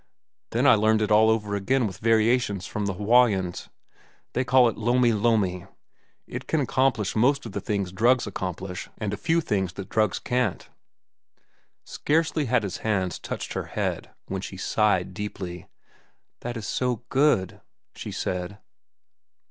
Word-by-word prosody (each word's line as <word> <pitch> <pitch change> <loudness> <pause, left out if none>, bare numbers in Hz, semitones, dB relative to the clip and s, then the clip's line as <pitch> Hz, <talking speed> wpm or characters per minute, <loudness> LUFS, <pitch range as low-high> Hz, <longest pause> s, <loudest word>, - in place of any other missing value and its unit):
Then - - 0
I - - +8
learned 110 0 +3
it 105 - -2
all 110 +1 +6
over 105 -2 0
again 120 +6 +1
with 95 -3 -5
variations 110 -3 +2
from 105 -1 -3
the 95 - -2
Hawaiians. 105 -4 +2 0.6
They 125 - +1
call 125 -1 +5
it 115 - -1
lomi 120 +1 +2
lomi. 100 -5 +1 0.6
It - - -7
can 160 - +1
accomplish 130 -5 +1
most 135 +6 +2
of 115 - -6
the - - -4
things 100 -4 -2
drugs 120 +6 +3
accomplish 90 -2 -5
and 105 -2 -3
a - - 0
few 165 +10 +1
things 95 - -1
that 95 0 -8
drugs 110 -4 +1
can't." 125 -6 -1 1.2
Scarcely 155 0 0
had 125 -2 +2
his 95 -3 -4
hands 95 -5 -1
touched - - -5
her - - -3
head - - -3 0.2
when 95 -1 -3
she 95 - -7
sighed 95 -2 +1
deeply. 95 -3 -6 0.7
"That 120 0 -5
is 110 - -6
so 125 -2 -1
good," 135 - +2 0.3
she - - -7
said. 90 +2 -3
105 Hz, 155 wpm, -25 LUFS, 95-125 Hz, 1.2 s, I